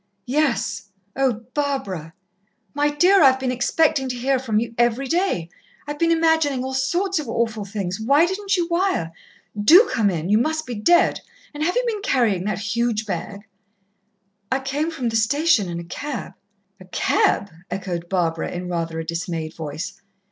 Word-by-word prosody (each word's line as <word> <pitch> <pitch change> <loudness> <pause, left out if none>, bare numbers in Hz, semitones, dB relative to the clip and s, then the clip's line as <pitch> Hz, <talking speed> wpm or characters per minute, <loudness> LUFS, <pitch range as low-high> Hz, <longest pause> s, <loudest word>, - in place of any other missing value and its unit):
"Yes. 235 -7 0 0.3
Oh, 250 -4 0
Barbara!" 205 - -3 0.6
"My 290 +1 +2
dear 360 +7 +4
I've 265 -2 +6
been 260 -1 -1
expecting 270 +2 +1
to 250 - -2
hear 260 +2 +1
from 225 -5 0
you 230 0 -4
every 240 +3 +1
day! 330 - 0 0.4
I've 295 0 -6
been 335 - +3
imagining 320 -5 +2
all 265 0 -4
sorts 345 +8 0
of 290 -6 -6
awful 225 -3 -1
things. 195 -2 -4
Why 280 +9 +4
didn't 390 +2 -1
you 345 -1 0
wire? 345 - 0 0.4
Do 325 - +7
come 215 -3 +2
in 170 -3 -2
you 210 +3 +4
must 315 +4 -1
be 250 - -5
dead, 340 +11 +3 0.3
and 295 - -7
have 350 +3 0
you - - +2
been 440 -4 -2
carrying 220 - +1
that 210 -3 -1 0.2
huge 235 -2 0
bag?" 200 +1 -5 1.1
"I 265 - +2
came 285 +4 -1
from 265 -8 -2
the 225 - -3
station 245 - +2
in 170 0 -4
a - - -6
cab." 260 +10 -6 0.5
"A 185 - -13
cab!" 195 +1 +1 0.2
echoed 175 -3 -4
Barbara 165 -3 0
in 180 0 -5
rather 165 -2 -3
a 165 - -4
dismayed 165 -1 -4
voice. 160 +5 -6
245 Hz, 170 wpm, -22 LUFS, 195-300 Hz, 1.1 s, Do